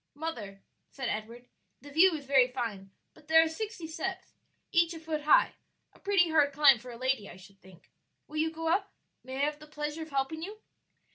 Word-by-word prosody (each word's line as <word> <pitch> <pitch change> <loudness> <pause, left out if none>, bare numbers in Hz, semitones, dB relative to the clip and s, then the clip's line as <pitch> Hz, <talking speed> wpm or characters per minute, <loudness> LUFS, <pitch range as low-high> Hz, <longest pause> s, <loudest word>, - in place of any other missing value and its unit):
"Mother," 230 -11 -6 0.3
said 265 -4 -4
Edward, 230 +3 -5 0.3
"the 285 - -13
view 335 +4 +5
is 290 -3 -7
very 265 -2 +5
fine, 230 -7 -5 0.2
but 295 - -21
there 320 0 +7
are - - 0
sixty 410 +2 -5
steps, 330 +4 -5 0.4
each 340 -1 +3
a - - -7
foot 315 -2 -4
high; - - +5 0.4
a - - -21
pretty 375 -5 +2
hard 295 -3 +3
climb 280 -4 +6
for 250 +3 -11
a 235 - -8
lady, 255 -4 -1
I - - -11
should 195 +1 -17
think. 185 -2 -18 0.4
Will 310 - -8
you 315 +1 +2
go 325 0 -5
up? 390 +4 +1 0.3
may 260 0 -7
I 275 +2 +1
have 300 0 -3
the 305 - -13
pleasure 300 +1 -5
of 315 - -7
helping 275 +3 -2
you?" 410 +6 -7
295 Hz, 210 wpm, -30 LUFS, 250-325 Hz, 0.4 s, there